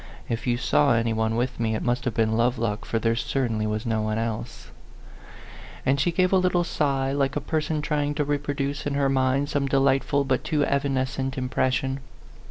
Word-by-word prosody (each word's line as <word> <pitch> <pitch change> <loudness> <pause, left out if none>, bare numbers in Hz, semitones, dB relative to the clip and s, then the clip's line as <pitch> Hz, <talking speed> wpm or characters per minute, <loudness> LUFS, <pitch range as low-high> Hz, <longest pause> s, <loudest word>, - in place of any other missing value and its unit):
" - - -21
If 120 - -9
you 120 -1 +2
saw 140 +1 +3
any 115 0 +1
one 110 0 0
with 125 +1 -1
me, 110 -1 0
it - - -3
must 120 0 0
have 120 -3 -1
been 110 -1 +2
Lovelock, 115 -2 0
for 115 - -1
there 115 0 +1
certainly 115 -4 -1
was 105 +1 -2
no 110 -2 0
one 110 0 -1
else," 115 - -4 1.1
And 135 +2 +2
she 155 +6 +2
gave 185 +2 +2
a - - +6
little 180 -1 +2
sigh, 135 -5 0
like 140 -1 0
a - - +1
person 155 +1 -2
trying 145 -1 0
to 150 - +1
reproduce 145 0 -2
in 140 - -1
her 140 -1 +2
mind 135 +1 +1
some 140 -2 0
de 135 0 +2
lightful 135 +1 +2
but 130 -1 0
too 150 -3 +1
evanescent 135 -1 -1
impression. 130 +1 0
135 Hz, 200 wpm, -25 LUFS, 115-145 Hz, 1.1 s, a